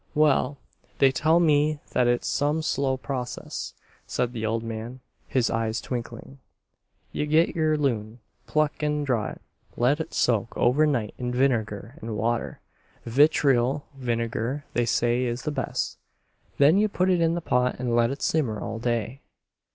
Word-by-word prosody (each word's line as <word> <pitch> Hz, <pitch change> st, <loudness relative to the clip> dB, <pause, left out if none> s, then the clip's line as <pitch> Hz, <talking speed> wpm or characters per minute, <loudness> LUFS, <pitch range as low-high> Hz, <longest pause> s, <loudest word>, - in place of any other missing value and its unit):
"Well, 150 Hz, -1 st, +3 dB, 0.4 s
they 135 Hz, -1 st, +5 dB
tell 160 Hz, +5 st, +3 dB
me 150 Hz, -2 st, +3 dB
thet 125 Hz, -, +1 dB
it's 120 Hz, 0 st, +1 dB
some 150 Hz, +2 st, 0 dB
slow 135 Hz, -3 st, 0 dB
process," 130 Hz, -2 st, -5 dB, 0.3 s
said 125 Hz, -1 st, -1 dB
the 110 Hz, -2 st, -2 dB
old 115 Hz, +1 st, -1 dB
man, 115 Hz, +3 st, -6 dB, 0.3 s
his 125 Hz, -3 st, +1 dB
eyes 115 Hz, 0 st, -1 dB
twinkling. 125 Hz, +2 st, -6 dB, 0.7 s
"Ye 150 Hz, -, -2 dB
git 160 Hz, +3 st, +3 dB
yer 155 Hz, -1 st, +2 dB
loon, 115 Hz, -6 st, -1 dB, 0.3 s
pluck 155 Hz, 0 st, 0 dB
an' 150 Hz, 0 st, 0 dB
draw 125 Hz, -6 st, 0 dB
it, -, -, -9 dB, 0.4 s
let 130 Hz, +6 st, +2 dB
it 160 Hz, 0 st, -5 dB
soak 115 Hz, -2 st, +1 dB
overnight 125 Hz, -3 st, +2 dB
in 125 Hz, -1 st, -2 dB
vinegar 120 Hz, -1 st, -1 dB
an' 115 Hz, -6 st, -4 dB
water, 115 Hz, +2 st, -2 dB, 0.4 s
vitriol 135 Hz, +1 st, +3 dB
vinegar 120 Hz, +2 st, -2 dB
they 120 Hz, -1 st, +1 dB
say 120 Hz, +2 st, +2 dB
is 120 Hz, 0 st, -3 dB
the 150 Hz, -, -2 dB
best. 135 Hz, -2 st, -3 dB, 0.6 s
Then 150 Hz, +7 st, +5 dB
ye 215 Hz, -, +3 dB
put 185 Hz, -2 st, +1 dB
it 175 Hz, -2 st, +2 dB
in 165 Hz, 0 st, +2 dB
the -, -, -1 dB
pot 125 Hz, -5 st, +1 dB
an' 125 Hz, -2 st, -1 dB
let 120 Hz, 0 st, +3 dB
it 140 Hz, +2 st, -5 dB
simmer 125 Hz, -10 st, 0 dB
all 115 Hz, +1 st, -5 dB
day." 120 Hz, +2 st, -2 dB
130 Hz, 160 wpm, -25 LUFS, 115-150 Hz, 0.7 s, they